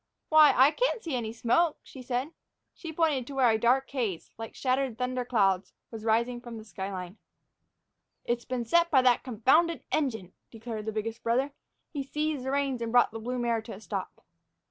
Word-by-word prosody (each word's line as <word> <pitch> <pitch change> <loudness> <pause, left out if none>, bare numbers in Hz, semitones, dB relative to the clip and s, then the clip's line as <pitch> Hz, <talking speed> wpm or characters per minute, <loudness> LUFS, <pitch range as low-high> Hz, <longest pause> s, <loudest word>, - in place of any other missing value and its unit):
"Why, 310 -1 +8
I 265 +4 +7
can - - 0
see 250 - -3
smoke," 245 +8 +1
she 265 - -11
said. 255 +4 -2 0.4
She 330 - -8
pointed 305 -6 +1
to 280 - -7
where 255 -3 +4
a 220 - +1
dark 255 +4 +3
haze, 225 -11 -3
like 225 0 -8
shattered 260 -2 0
thunder 250 0 -1
clouds, 195 -6 +1 0.2
was 225 -2 -8
rising 235 +2 +1
from 240 -2 -8
the 220 - -9
sky 195 -1 -6
line. 185 +1 -7 1.1
"It's 240 0 -1
been 250 -2 -3
set 340 +7 +3
by 265 -5 +4
that 250 -2 +4
confounded 270 +8 +2
engine," 220 - -1 0.2
declared 225 -1 -7
the - - 0
biggest 220 +1 -4
brother. 255 +5 +1 0.4
He 290 - -3
seized 300 0 -2
the 265 - -1
reins 275 -3 0
and 230 -1 -2
brought 245 0 +4
the 225 - -6
blue 250 +3 -3
mare 235 -2 0
to 220 - -9
a 195 - -9
stop. - - -6
245 Hz, 190 wpm, -28 LUFS, 225-275 Hz, 1.1 s, Why